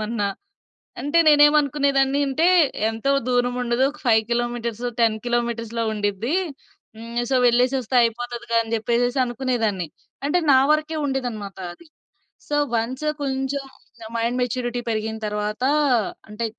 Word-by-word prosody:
ఏమన్నా! 215 -1 -1 0.7
అంటే, 290 +4 +1
నేనేమనుకునేదాన్ని 285 -2 +4
అంటే, 315 +6 +2 0.4
ఎంతో 225 +5 -1 0.2
దూరం 245 0 +1
ఉండదు, 240 +1 0
ఒక 300 - -16
5 220 -2 +5
కిలోమీటర్స్, 240 -1 -2 0.2
10 225 -2 +3
కిలోమీటర్స్‌లో 235 -1 -1
ఉండిద్ది. 210 - -2 0.6
హ్మ్. 235 +1 -4
సో, 265 - +3
వెళ్ళేసొస్తే 250 +1 +2
అయిపోతదిగా 235 0 -2
అని 225 0 -9
జెప్పేసేసి 240 +3 0
అనుకునేదాన్ని. 240 -7 -1 0.4
అంటే, 295 +5 +2
నా 260 - +7
వరకే 310 +1 -1
ఉండేదనమాట 240 -7 -4 0.2
అది. 340 - -17 0.6
సో, 295 - 0 0.2
వన్స్ 250 +6 -2 0.2
కొంచెం, 270 0 -2 0.4
నా 220 - -8
మైండ్ 235 +2 -1
మెచ్యూరిటీ 245 0 -2
పెరిగిన 220 0 -2
తరవాతా 210 +4 -1 0.6
అంటే 210 +2 -4
240 Hz, 125 wpm, -22 LUFS, 225-270 Hz, 0.7 s, నా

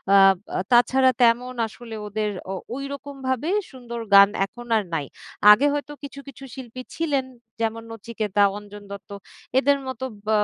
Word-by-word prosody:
আব 195 -1 +7 0.2
আ - - 0
তাছাড়া 255 +2 +5
তেমন 245 +2 +3
আসলে 230 +1 -10
ওদের 210 +1 -2 0.2
ও - - -2 0.2
ওইরকমভাবে 275 0 -4 0.2
সুন্দর 240 -3 -7
গান 200 0 +9 0.2
এখন 240 +4 -12
আর 215 - 0
নাই। 150 -3 -1 0.5
আগে 220 +7 +6
হয়তো 290 0 -3
কিছু, 280 0 -8
কিছু 275 0 -11
শিল্পী 255 -1 -8
ছিলেন 290 -5 0 0.4
যেমন 225 0 -1
নচিকেতা, 215 -2 -2 0.2
অঞ্জন 205 0 -11
দত্ত 200 +2 -9 0.5
এদের 280 +2 +3
মতো 260 0 -4 0.2
ব্য - - -4
240 Hz, 150 wpm, -24 LUFS, 210-265 Hz, 0.5 s, গান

